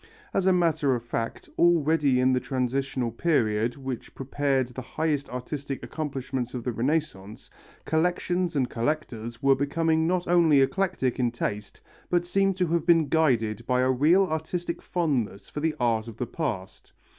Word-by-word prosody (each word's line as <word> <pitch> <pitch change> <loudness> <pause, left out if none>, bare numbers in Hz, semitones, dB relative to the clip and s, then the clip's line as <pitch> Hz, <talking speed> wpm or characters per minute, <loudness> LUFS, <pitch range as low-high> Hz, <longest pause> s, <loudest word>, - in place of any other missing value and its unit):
As 190 - +1
a - - +6
matter 160 -6 +2
of 120 - -5
fact, 115 -1 -4
already 160 -5 +3
in 130 +1 +3
the 125 - +2
transitional 130 -1 -2
period 115 -5 +1
which 130 -3 -6
prepared 135 -1 0
the 125 +1 -7
highest 145 +2 -2
artistic 135 +2 -5
accomplishment 135 -5 -4
of 120 - -4
the 125 - -1
Renaissance, 115 -6 -3 0.3
collections 175 +1 0
and 130 -3 +2
collectors 120 -3 -3
were 135 0 +6
becoming 160 +4 +1
not 180 0 0
only 170 -5 +5
eclectic 135 -3 0
in 125 -1 +2
taste, 105 -3 -5 0.3
but 175 -1 +1
seem 195 +1 +1
to 180 -1 +1
have 170 -1 -1
been 165 -4 +4
guided 120 -9 +1
by 125 0 +2
a 130 0 +3
real 155 +9 +4
artistic 170 +1 -3
fondness 135 - -2
for - - -5
the 155 +1 0
art 115 -2 +1
of 115 -2 -9
the 125 - -2
past. 115 - -5
140 Hz, 160 wpm, -26 LUFS, 125-160 Hz, 0.3 s, a